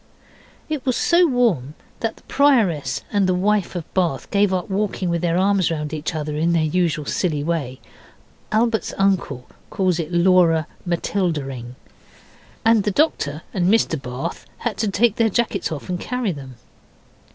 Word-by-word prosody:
It 305 -4 -3
was 255 -2 0
so 345 +1 +4
warm 205 - +1 0.2
that 225 -1 -2
the - - -21
Prioress 230 - +2
and 200 -2 +3
the 185 - +2
wife 200 0 +1
of 175 - -3
Bath 170 -8 -1
gave 200 -1 +3
up 185 -2 -1
walking 195 -2 -1
with 170 -1 -1
their 170 -1 +1
arms 195 -1 +2
round 150 -2 -3
each 155 +2 -3
other 150 -1 -3
in 165 +3 +1
their 165 -2 +2
usual 155 -2 0
silly 150 -2 -1
way 145 -6 -2 0.7
(Albert's 220 +1 +1
uncle 185 -10 0 0.2
calls 185 -4 0
it 165 0 -3
Laura 170 -2 +4 0.2
Matildaing), 150 -9 -2 0.9
and 225 -2 +5
the 210 - +1
Doctor 170 - 0
and 180 -1 +1
Mr 195 -9 +2
Bath 125 0 -5
had 240 -3 -3
to 220 - 0
take 215 +2 +2
their 230 -1 +3
jackets 210 -5 -1
off 155 - -5
and 180 -1 -3
carry 250 -3 -2
them. 135 -5 -9
180 Hz, 165 wpm, -21 LUFS, 155-210 Hz, 0.9 s, and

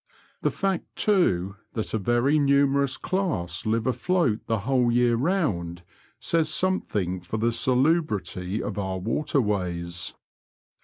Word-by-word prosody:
The - - +2
fact, 195 -3 -2
too, 100 - +1 0.2
that 110 - -3
a 110 - +1
rery 120 +8 +2
numerous 140 -1 +3
class 115 - -2
live 110 +1 +1
afloat 130 - +1
the 110 -2 0
whole 125 +1 +2
yecff 120 -1 +3
round 95 - -1 0.4
says 165 -2 +1
something 105 - -1
for 90 +5 -4
the 115 +2 +1
salubrity 115 - 0
of 105 -1 -4
our 95 -1 -2
waterways. 90 - -1
115 Hz, 120 wpm, -25 LUFS, 95-145 Hz, 0.4 s, numerous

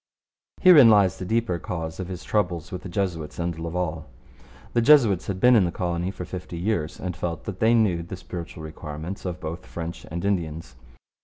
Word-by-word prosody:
Herein 155 -10 +9
lies 100 -4 +4
the 95 - -4
deeper 110 -4 0
cause 80 -1 -5
of 95 - -4
his 90 -2 -7
troubles 90 -6 -1
with 90 - -5
the 95 - -8
Jesuits 85 -5 -3
and 85 -1 -3
Laval. 80 -1 -3 0.7
The 120 - +3
Jesuits 115 - +5
had 95 -2 -3
been 125 +4 +6
in 105 - +6
the 85 - -1
colony 85 0 -2
for 90 -2 -6
fifty 90 -1 -7
years 85 -4 -2
and 90 -1 -4
felt 85 -1 -4
that 95 -3 -6
they 115 +1 +4
knew 100 -7 +2
the 85 +3 -7
spiritual 85 -3 -8
requirements 80 +4 -7
of 90 -1 -4
both 85 +3 -6
French 85 0 -6
and 85 +3 -4
Indians. 80 -8 -2
90 Hz, 190 wpm, -25 LUFS, 85-100 Hz, 0.7 s, Herein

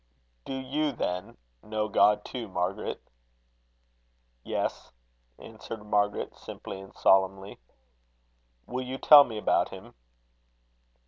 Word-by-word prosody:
"Do - - -5
you, 140 +3 -1
then, 90 -6 -4 0.2
know 110 0 -2
God 105 0 +3
too, 120 -4 -6
Margaret?" 95 +2 -3 1.4
"Yes," - - -3 0.5
answered 110 -2 -10
Margaret, 105 -1 0
simply 95 - -9
and 95 +1 -14
solemnly. 95 +1 +2 1.1
"Will 130 +1 -4
you 130 +1 -5
tell 145 0 +9
me 110 -3 -7
about 105 - +1
him?" - - -11
105 Hz, 105 wpm, -28 LUFS, 95-130 Hz, 1.4 s, tell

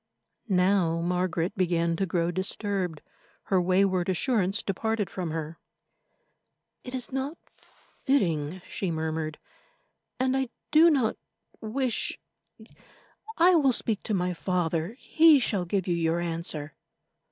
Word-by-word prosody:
Now 180 -3 +2
Margaret 180 +1 -1
began 170 -2 +1
to 195 - 0
grow 170 0 0
disturbed; 185 -3 -3 0.4
her 190 -2 +2
wayward 185 0 +2
assurance 200 +1 +1
departed 210 +1 -2
from 180 -3 -4
her. 160 0 -5 1.2
"It 250 0 -6
is 255 0 -4
not 270 +5 -3 0.7
fitting," 175 - 0
she 190 - -3
murmured, 160 -1 -3 0.8
"and 260 0 +1
I 265 -2 0 0.2
do 320 +2 +7
not 260 -8 +1 0.4
wish—I 275 - -3
will 290 -6 +4
speak 225 -3 0
to 215 - -2
my 180 -1 0
father; 175 0 -1
he 315 0 +5
shall 200 -7 0
give 190 +1 -1
you 180 - 0
your 165 0 +1
answer." 165 -3 -4
185 Hz, 120 wpm, -27 LUFS, 170-225 Hz, 1.2 s, do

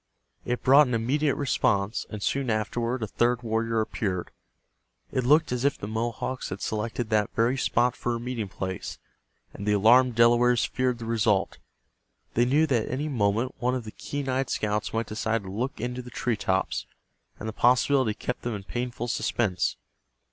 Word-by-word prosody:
It 125 0 -2
brought 140 +2 +7
an 125 - 0
immediate 135 +6 +1
response, 115 -6 0
and 105 -2 -6
soon 135 -2 0
afterward 115 +3 -1
a - - -2
third 120 +3 +1
warrior 115 0 0
appeared. 100 -5 -3 0.8
It 130 - 0
looked 150 +5 +4
as 125 0 -1
if 140 0 +2
the 100 - -6
Mohawks 115 +3 -3
had 95 - -5
selected 110 +1 -3
that 105 -2 +2
very 115 +3 +2
spot 125 -1 +1
for 120 - -2
a - - -3
meeting 120 -3 -3
place, 95 -1 -5 0.6
and 100 - -7
the 105 - +3
alarmed 120 +4 +5
Delawares 120 +1 +4
feared 130 -2 -1
the 115 - -7
result. 110 -4 +1 0.7
They 120 - +3
knew 145 +5 +3
that 125 -8 0
at - - -5
any 145 +4 -2
moment 115 0 0
one 125 +2 +1
of 125 - -3
the 110 - -8
keen 145 +4 -5
eyed 130 0 0
scouts 105 0 -1
might 115 +1 -1
decide 110 +1 -2
to 95 - -7
look 125 +7 -3
into 125 +2 -3
the 125 - -10
tree 120 0 -1
tops, 95 -1 -1 0.5
and 110 - -5
the 110 - -4
possibility 125 -1 +3
kept 125 - -4
them 120 -2 -3
in 100 - -7
painful 120 +2 -4
suspense. 105 -5 0
120 Hz, 185 wpm, -26 LUFS, 110-125 Hz, 0.8 s, brought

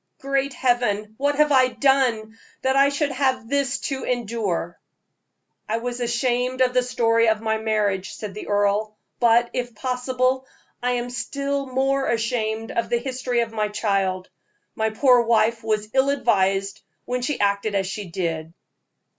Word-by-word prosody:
Great 275 0 -1
Heaven! 235 -5 0
what 285 +1 +1
have 300 0 +3
I 260 -2 +5
done, 250 -5 +1 0.3
that 265 0 +2
I 275 +1 +5
should 285 0 -1
have 260 -3 0
this 280 +1 0
to 270 -2 -3
endure?" 220 -8 -2 0.9
"I 220 - +1
was 245 +1 -4
ashamed 245 +1 0
of 250 -1 +3
the 250 - +4
story 230 -2 +2
of 220 -1 +1
my 220 0 -1
marriage," 210 -3 -1
said 210 -3 -7
the 210 - -8
earl, 205 +1 +1 0.2
"but, 235 0 +4
if 245 -2 -3
possible, 255 +2 -1 0.3
I 250 0 +1
am 245 0 -2
still 280 +2 -3
more 270 +1 0
ashamed 225 -1 -1
of 230 - -1
the 240 - +2
history 250 -1 -1
of 230 -1 -3
my 215 -1 0
child. 195 -3 -1 0.5
My 220 0 0
poor 245 +2 +4
wife 230 0 +2
was 215 -1 -1
ill 265 +1 +3
advised 195 -7 +1 0.2
when 250 0 -2
she 275 +3 -2
acted 200 +1 +1
as 195 -1 +1
she 200 +2 -5
did." 165 -2 -3
235 Hz, 160 wpm, -23 LUFS, 215-260 Hz, 0.9 s, I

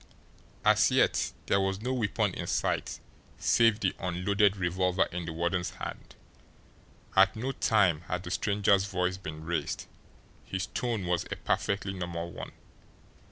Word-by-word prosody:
As - - +5
yet - - +2
there 100 - +2
was 95 0 -1
no 125 +4 -2
weapon 110 -4 0
in - - -5
sight, - - -1 0.4
save 115 -2 +3
the 95 - +1
unloaded 100 +3 +2
revolver 90 +1 +1
in 90 -1 -4
the 80 - -4
warden's 90 +3 -1
hand; - - -7 1.0
at 95 0 +6
no 125 +5 -2
time 95 - +2
had 90 0 -2
the 90 - -6
stranger's 100 -1 +2
voice 90 -2 -1
been 80 -5 -7
raised. 85 0 -2 0.6
His 95 -1 -3
tone 115 -2 -2
was 90 0 0
a - - -4
perfectly 100 -1 -1
normal 85 -2 -4
one. - - -8
95 Hz, 145 wpm, -29 LUFS, 90-100 Hz, 1.0 s, at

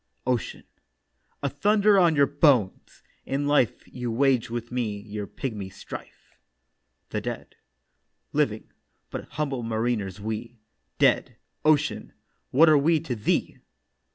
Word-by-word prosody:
OCEAN: 125 -3 -2 0.8
'A 140 - +1
thunder 205 +7 +3
on 170 -3 +4
your 140 -1 +5
bones! 140 - +1 0.2
In 140 +2 -2
life 145 -6 +2
You 125 -1 -5
waged 130 0 +2
with 120 0 -5
me 115 -5 -2
your 105 -1 -6
pigmy 105 -7 -5
strife.' 100 +1 -11 0.7
THE - - -2
DEAD: - - -6 0.8
'Living, - - 0 0.4
but - - -5
humble 140 -4 -2
mariners 110 -3 -2
we; 110 +3 -5 0.4
Dead, - - +3 0.3
Ocean, 150 -1 +1 0.4
what 155 +6 +6
are 155 -2 +6
we 160 +3 +3
to 125 - -3
thee? 105 - -1
125 Hz, 125 wpm, -26 LUFS, 110-145 Hz, 0.8 s, what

